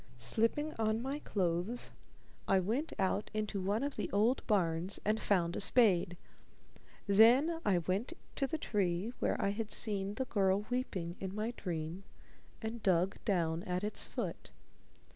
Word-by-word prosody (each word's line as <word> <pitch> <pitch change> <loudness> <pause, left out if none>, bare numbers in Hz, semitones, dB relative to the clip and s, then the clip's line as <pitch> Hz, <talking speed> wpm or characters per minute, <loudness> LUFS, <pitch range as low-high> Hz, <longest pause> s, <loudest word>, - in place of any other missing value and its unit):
Slipping 230 - +1
on 220 0 +1
my 270 +4 -3
clothes, 185 - -1 0.6
I 195 - +4
went 235 - -1
out 195 +2 0
into 210 -2 -2
one 205 +6 0
of 285 0 -3
the - - -2
old 220 +6 +2
barns 180 -3 +1
and 215 +1 +1
found 175 -4 +1
a - - -2
spade. 195 -6 +4 0.9
Then 245 +11 +5
I 195 -3 +3
went 190 - -1 0.2
to 275 - +1
the 320 - -2
tree 200 - -1
where - - 0
I 200 - +1
had 215 +2 -3
seen 200 -3 0
the 260 - -2
girl 200 -3 +1
weeping 190 -9 -2
in 190 0 -5
my 215 +2 -1
dream 165 0 -4 0.6
and 225 +1 -4
dug 185 0 +1
down 170 -5 +1
at 180 +1 -2
its 210 - 0
foot. - - -5
205 Hz, 155 wpm, -34 LUFS, 185-230 Hz, 0.9 s, Then